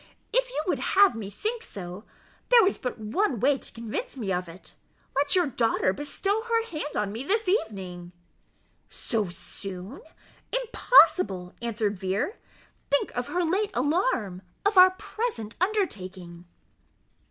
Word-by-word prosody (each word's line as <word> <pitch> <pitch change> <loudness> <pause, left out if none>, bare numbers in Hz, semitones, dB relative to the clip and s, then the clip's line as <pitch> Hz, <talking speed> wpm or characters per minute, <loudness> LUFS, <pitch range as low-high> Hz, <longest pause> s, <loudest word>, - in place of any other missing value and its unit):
"If - - +2
you 405 -11 -2
would 365 - 0
have 400 0 +5
me 220 -4 -6
think 440 - -3
so, 190 - -8 0.4
there 475 -4 +7
is 390 - 0
but 250 - -4
one 235 - 0
way 270 +4 +3
to - - -5
convince 235 - -5
me 200 -6 -2
of 180 -1 -2
it 170 +3 -13 0.4
let 285 +3 +2
your 360 -2 +4
daughter 230 -7 +1
bestow 390 - -1
her 460 0 0
hand 305 -8 -5
on 205 -1 0
me 225 +5 -5
this 430 +7 0
evening." 190 - -2 0.8
"So 215 -7 -2
soon? 190 +5 -8 0.5
impossible," 365 - +4
answered 215 -4 -1
Vere; 195 - -2 0.5
"think 285 - +1
of 245 0 -2
her 360 0 0
late 390 +5 +1
alarm 250 - 0 0.2
of 405 +1 +3
our 370 0 +10
present 370 - -4
undertaking." 185 - -2
250 Hz, 140 wpm, -27 LUFS, -, 0.8 s, our